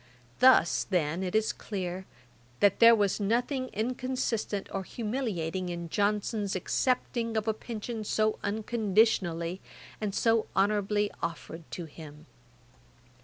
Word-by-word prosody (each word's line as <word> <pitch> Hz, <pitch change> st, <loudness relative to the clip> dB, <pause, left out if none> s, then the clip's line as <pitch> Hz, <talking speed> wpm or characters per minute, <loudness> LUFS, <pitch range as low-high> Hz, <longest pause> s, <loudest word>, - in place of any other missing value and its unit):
Thus, 255 Hz, -9 st, +5 dB
then, 170 Hz, -2 st, 0 dB
it 185 Hz, +1 st, -3 dB
is 220 Hz, 0 st, +2 dB
clear, 185 Hz, -2 st, -5 dB, 0.5 s
that 205 Hz, -, +4 dB
there 230 Hz, 0 st, +9 dB
was 205 Hz, -2 st, +1 dB
nothing 245 Hz, +6 st, 0 dB
inconsistent 240 Hz, -3 st, -2 dB
or 195 Hz, -, -1 dB
humiliating 190 Hz, -6 st, -3 dB
in 170 Hz, -1 st, -5 dB
Johnson's 205 Hz, +1 st, 0 dB
accepting 230 Hz, +3 st, 0 dB
of 215 Hz, 0 st, -1 dB
a 220 Hz, -, +2 dB
pension 220 Hz, 0 st, -6 dB
so 215 Hz, +1 st, 0 dB
unconditionally 205 Hz, -5 st, +1 dB, 0.4 s
and 205 Hz, -2 st, -2 dB
so 225 Hz, -1 st, +2 dB
honourably 205 Hz, 0 st, +1 dB
offered 170 Hz, -1 st, -5 dB
to 175 Hz, -, -5 dB
him. 150 Hz, -1 st, -12 dB
205 Hz, 120 wpm, -29 LUFS, 185-225 Hz, 0.5 s, there